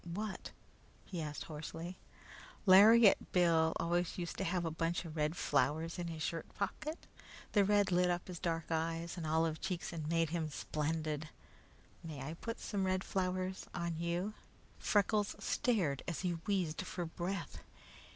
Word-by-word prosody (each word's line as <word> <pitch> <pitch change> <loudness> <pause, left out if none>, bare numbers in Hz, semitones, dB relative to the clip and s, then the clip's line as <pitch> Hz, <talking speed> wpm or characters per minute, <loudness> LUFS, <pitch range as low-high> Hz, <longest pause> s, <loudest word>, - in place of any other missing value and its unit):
"What?" 210 -2 -4 0.6
he 175 -4 -4
asked 150 -1 -4
hoarsely. 165 +3 -6 0.7
"Lariat 210 +3 +8
Bill 170 -3 +4
used 160 - -1
always 175 +1 0 0.2
to - - -3
have 175 0 0
a 165 - -1
bunch 165 +2 -1
of 160 -1 -7
red 155 +1 0
flowers 155 +4 +1
in 175 - -2
his 160 -2 -4
shirt 165 -1 -2
pocket. 305 +10 -3 0.5
The 205 - +5
red 205 -1 +3
lit 180 0 +4
up 175 0 -1
his 180 -3 -6
dark 165 -2 -2
eyes 165 +1 -1
and 165 -3 -4
olive 160 0 +1
cheeks 175 -2 -3
and 155 -2 -4
made 165 -1 +2
him 165 -2 -1
splendid. 155 +1 -2 0.7
May 155 -4 -6
I 135 +4 -4
put 230 +7 -5
some 195 -3 -1
red 185 0 +1
flowers 185 0 -2
on 170 -1 -2
you?" 170 +5 -1 0.5
Freckles 205 0 +2
stared 190 - +1
as 170 - -2
he 180 -1 0 0.2
wheezed 185 -6 0
for 180 -1 -4
breath. 175 +4 -4
170 Hz, 160 wpm, -35 LUFS, 160-185 Hz, 0.7 s, Lariat